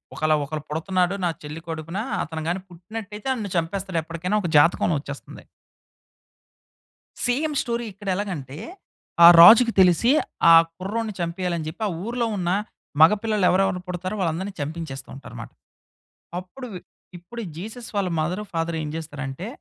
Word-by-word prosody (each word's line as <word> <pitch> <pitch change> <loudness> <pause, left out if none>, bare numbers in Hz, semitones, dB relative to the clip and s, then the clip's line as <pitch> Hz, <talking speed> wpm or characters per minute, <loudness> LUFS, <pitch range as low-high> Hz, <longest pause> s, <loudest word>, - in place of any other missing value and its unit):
ఒకల 155 0 +1
ఒకలు 150 +2 -5
పుడుతున్నాడు 180 +4 0
నా - - +2
చెల్లి 150 +2 -8
కడుపున 165 +2 -5 0.3
అతను 160 0 -6
గాని 180 +2 -2
పుట్టినట్టయితే, 210 +5 -8
నన్ను 215 -6 -5
చంపేస్తాడు, 185 +1 -2
ఎప్పటికైనా 170 +5 -2
ఒక 175 - -3
జాతకంలోచ్చేస్తుంది. 145 -2 0 1.8
సేమ్ 295 +5 0
స్టోరీ 235 -1 -3
ఇక్కడ 200 +1 -13
ఎలాగంటే, 165 -9 -5 0.7
ఆ - - +12
రాజుకి 230 +7 +9
తెలిసి 185 +6 +5 0.4
ఆ - - +9 0.2
కుర్రోడిని 215 +4 -3
చంపేయాలి 175 +1 -2
అని 160 - -5
చెప్పి 190 +8 -7
ఆ - - -1 0.2
ఊర్లో 235 +1 -1
ఉన్న 175 -2 -1 0.5
మగపిల్లలు 210 +3 +4
ఎవరెవరిని 190 0 +1
పుడతారో 180 +3 -4
వాళ్ళందరిని 185 +3 -2
చంపించేస్తూ 145 -3 -6
ఉంటారు 135 - -11
మాట. - - -9 0.9
అప్పుడు, 185 +9 -9 0.5
ఇప్పుడు 205 +8 -8 0.2
జీసస్ 225 +6 -8
వాళ్ళ 195 -2 +1
మదర్ 175 +6 -2
ఫాదర్ 165 0 -2
ఏం 150 - -4
చేస్తారంటే 145 0 -6
180 Hz, 135 wpm, -23 LUFS, 165-205 Hz, 1.8 s, ఆ